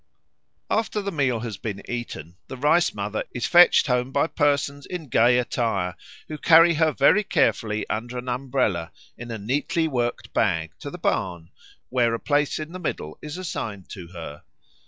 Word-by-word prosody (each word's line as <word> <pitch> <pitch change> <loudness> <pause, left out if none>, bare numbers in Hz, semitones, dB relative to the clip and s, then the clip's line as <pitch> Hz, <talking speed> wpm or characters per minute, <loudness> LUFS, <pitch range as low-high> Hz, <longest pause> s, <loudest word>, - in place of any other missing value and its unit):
After 220 -1 0
the 200 -1 -3
meal 135 - 0
has 110 -4 -5
been 100 -3 -5
eaten, 120 -9 -6
the 130 - -7
Rice 150 +6 +3
mother 105 +1 -3
is 120 -1 -1
fetched 175 +7 +6
home 125 0 0
by 140 - +2
persons 145 -2 0
in 170 -6 -6
gay 120 +2 +4
attire, 110 -7 -1 0.3
who 155 -1 -7
carry 165 +2 +6
her 160 0 +2
very 145 +10 +4
carefully 110 - 0
under 120 +3 -4
an 125 +1 -6
umbrella 120 -10 -1 0.2
in 120 0 -9
a 115 - -4
neatly 140 +9 0
worked 120 -5 -2
bag 80 -7 +1
to - - -6
the - - -8
barn, 85 -3 -2 0.4
where 120 -2 +2
a - - -5
place 145 -1 +1
in 155 +1 -6
the 185 - -7
middle 80 - -4
is 150 +3 -7
assigned 110 - -5
to 90 -5 -8
her. 85 -4 -9
125 Hz, 175 wpm, -24 LUFS, 105-150 Hz, 0.4 s, fetched